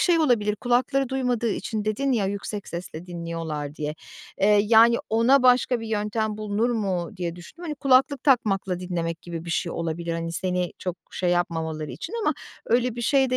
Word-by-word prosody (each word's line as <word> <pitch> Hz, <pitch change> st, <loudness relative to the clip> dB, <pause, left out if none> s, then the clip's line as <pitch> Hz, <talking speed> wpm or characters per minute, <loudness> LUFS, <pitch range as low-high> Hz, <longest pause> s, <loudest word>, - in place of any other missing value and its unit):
şey 350 Hz, -4 st, +4 dB
olabilir 220 Hz, -9 st, +2 dB
kulakları 255 Hz, +3 st, +1 dB
duymadığı 250 Hz, -3 st, 0 dB
için 215 Hz, +1 st, -3 dB
dedin 260 Hz, +6 st, 0 dB
ya 210 Hz, -5 st, +1 dB
yüksek 200 Hz, +1 st, -4 dB
sesle 170 Hz, 0 st, -7 dB
dinliyorlar 165 Hz, -4 st, -5 dB
diye. 150 Hz, 0 st, -3 dB, 0.5 s
Eee, 205 Hz, +1 st, +5 dB
yani 230 Hz, +1 st, +7 dB
ona 245 Hz, +4 st, +4 dB
başka 250 Hz, -1 st, +4 dB
bir 225 Hz, -, -6 dB
yöntem 215 Hz, 0 st, -1 dB
bulunur 215 Hz, +3 st, 0 dB
mu 195 Hz, -6 st, -1 dB
diye 175 Hz, -1 st, -3 dB
düşündüm. 240 Hz, -, -11 dB
Hani, 305 Hz, -3 st, -3 dB
kulaklık 270 Hz, 0 st, +3 dB
takmakla 195 Hz, -9 st, +2 dB
dinlemek 170 Hz, -2 st, -3 dB
gibi 170 Hz, -1 st, -6 dB
bir 170 Hz, -, -5 dB
şey 170 Hz, +1 st, -1 dB
olabilir, 170 Hz, 0 st, -3 dB
hani, 165 Hz, 0 st, -3 dB
seni 180 Hz, 0 st, -1 dB
çok 180 Hz, -1 st, -4 dB
şey 180 Hz, -1 st, -1 dB
yapmamaları 160 Hz, -3 st, -1 dB
için 335 Hz, -, -7 dB
ama -, -, +2 dB, 0.3 s
öyle 240 Hz, 0 st, +2 dB
bir 240 Hz, -, -3 dB
şey 265 Hz, 0 st, +3 dB
de 255 Hz, -, +2 dB
210 Hz, 180 wpm, -25 LUFS, 170-245 Hz, 0.5 s, yani